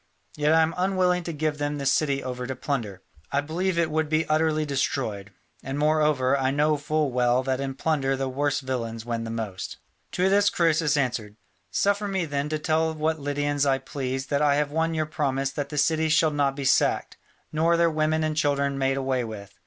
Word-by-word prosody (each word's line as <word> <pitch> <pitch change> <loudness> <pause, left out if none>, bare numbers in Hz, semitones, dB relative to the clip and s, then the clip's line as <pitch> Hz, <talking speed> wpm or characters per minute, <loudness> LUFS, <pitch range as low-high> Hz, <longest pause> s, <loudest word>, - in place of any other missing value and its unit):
Yet 150 0 +2
I 160 0 +5
am 160 +1 -1
unwilling 180 -1 +2
to 170 - -3
give 150 -1 -2
them 145 0 -1
this 140 -1 +1
city 140 -5 0
over 125 -1 -4
to 130 - -4
plunder. 115 - -4 0.3
I 140 - +2
believe 170 +5 -1
it 165 -2 +1
would 155 0 0
be 155 +1 +1
utterly 155 0 +1
destroyed, 130 -8 -2 0.3
and 135 +2 -4
moreover 150 -3 +2
I 135 -1 +1
know 150 +2 +2
full 150 0 -1
well 125 +1 +2
that 130 0 -1
in 135 -1 -3
plunder 135 -2 0
the 135 0 -2
worst 145 +3 -1
villains 115 -4 -4
win 115 -1 -3
the - - -5
most." 110 -5 -5 0.4
To 180 +1 +2
this 200 +1 +4
Croesus 160 -3 +2
answered, 120 -6 -2 0.3
"Suffer 200 - +1
me 190 -3 -1
then 145 -1 -2
to 155 - -1
tell 160 +1 0
what 155 +1 -1
Lydians 145 0 -1
I 135 -2 +3
please 135 -1 -4
that 145 0 0
I 145 -1 +4
have 145 0 0
won 160 +1 0
your 155 -1 0
promise 135 -4 -1
that 145 -2 -4
the 150 - -6
city 160 +2 +2
shall 155 0 +4
not 140 -2 +1
be 140 -1 -4
sacked, - - +2 0.3
nor 165 +2 +2
their 170 -1 +3
women 155 0 +1
and 155 0 -1
children 140 -2 0
made 135 0 +1
away 130 -2 0
with. 110 -3 -8
145 Hz, 205 wpm, -25 LUFS, 135-155 Hz, 0.4 s, I